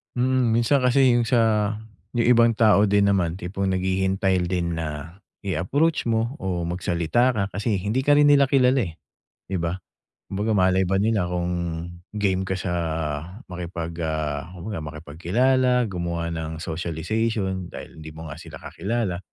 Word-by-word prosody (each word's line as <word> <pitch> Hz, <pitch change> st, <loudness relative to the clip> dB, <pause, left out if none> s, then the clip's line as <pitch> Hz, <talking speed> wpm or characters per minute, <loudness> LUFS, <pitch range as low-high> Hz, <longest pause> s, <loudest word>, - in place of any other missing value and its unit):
Mm, 125 Hz, -2 st, +2 dB
minsan 120 Hz, +4 st, +3 dB
kasi 125 Hz, 0 st, +4 dB
yung 120 Hz, -1 st, +2 dB
sa, 110 Hz, -3 st, +2 dB, 0.4 s
yung 115 Hz, -, +2 dB
ibang 115 Hz, -2 st, +5 dB
tao 105 Hz, -2 st, +5 dB
din 100 Hz, 0 st, +3 dB
naman 90 Hz, -3 st, +1 dB
tipong 95 Hz, +1 st, -3 dB
naghihintay 95 Hz, 0 st, +1 dB
din 85 Hz, -1 st, -1 dB
na 80 Hz, +3 st, -6 dB, 0.2 s
i-approach 140 Hz, -, 0 dB
mo 115 Hz, +4 st, 0 dB
o 90 Hz, -2 st, -2 dB
magsalita 85 Hz, +8 st, +1 dB
ka 100 Hz, -, +1 dB
kasi 105 Hz, +3 st, -1 dB
hindi 105 Hz, +7 st, -1 dB
ka 145 Hz, +2 st, +4 dB
rin 145 Hz, -, +6 dB
nila 140 Hz, -1 st, +5 dB
kilala, 130 Hz, 0 st, +4 dB
eh, 80 Hz, -, -10 dB, 0.5 s
'di 95 Hz, -, -3 dB
ba? 85 Hz, +2 st, -2 dB, 0.5 s
Kumbaga 105 Hz, +3 st, 0 dB
malay 95 Hz, -1 st, +3 dB
ba 95 Hz, -, 0 dB
nila 105 Hz, -4 st, +1 dB
kung 90 Hz, 0 st, -2 dB, 0.6 s
game 95 Hz, -2 st, 0 dB
ka 95 Hz, -, -1 dB
sa 90 Hz, -1 st, -3 dB, 0.8 s
makipag, 85 Hz, -1 st, -5 dB
ah, 75 Hz, -2 st, -2 dB
kumbaga 95 Hz, +3 st, -5 dB
makipagkilala, 105 Hz, -, +1 dB
gumawa 85 Hz, -2 st, -3 dB
nang 80 Hz, -1 st, -5 dB
socialization 95 Hz, +4 st, -2 dB
dahil 80 Hz, -, -10 dB
hindi 80 Hz, 0 st, -9 dB
mo 80 Hz, -1 st, -8 dB
nga 75 Hz, -, -8 dB
sila -, -, -11 dB
kakilala 105 Hz, -5 st, -2 dB
95 Hz, 150 wpm, -24 LUFS, 85-115 Hz, 0.8 s, rin